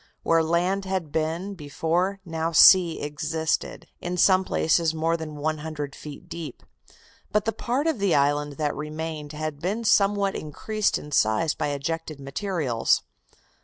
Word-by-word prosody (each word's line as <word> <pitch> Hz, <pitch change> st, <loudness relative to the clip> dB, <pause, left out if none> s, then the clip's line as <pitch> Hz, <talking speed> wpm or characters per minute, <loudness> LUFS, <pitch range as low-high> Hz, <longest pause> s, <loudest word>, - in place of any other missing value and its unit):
Where 165 Hz, 0 st, +3 dB
land 175 Hz, +4 st, 0 dB
had 190 Hz, -5 st, -3 dB
been 165 Hz, +6 st, -2 dB
before 175 Hz, +4 st, -1 dB
now 165 Hz, 0 st, -2 dB
sea 175 Hz, +1 st, +7 dB
existed, 155 Hz, +2 st, -2 dB
in 180 Hz, +1 st, -4 dB
some 185 Hz, +1 st, +5 dB
places 160 Hz, -2 st, +1 dB
more 165 Hz, +1 st, +1 dB
than 160 Hz, -2 st, -6 dB
one 155 Hz, +1 st, -2 dB
hundred 150 Hz, -2 st, -5 dB
feet 150 Hz, +4 st, -10 dB
deep. 170 Hz, -2 st, -7 dB, 0.7 s
But 210 Hz, -1 st, +1 dB
the 225 Hz, -, 0 dB
part 255 Hz, +5 st, -1 dB
of 320 Hz, -8 st, 0 dB
the 195 Hz, -4 st, +2 dB
island 145 Hz, +1 st, +1 dB
that 150 Hz, 0 st, -2 dB
remained 155 Hz, 0 st, -5 dB
had 155 Hz, -1 st, -4 dB
been 200 Hz, +8 st, -2 dB
somewhat 200 Hz, -2 st, +3 dB
increased 215 Hz, +8 st, -1 dB
in 150 Hz, -, -10 dB
size 120 Hz, +5 st, +2 dB
by -, -, -2 dB
ejected 155 Hz, +2 st, -4 dB
materials. 140 Hz, -, 0 dB
160 Hz, 150 wpm, -25 LUFS, 150-185 Hz, 0.7 s, sea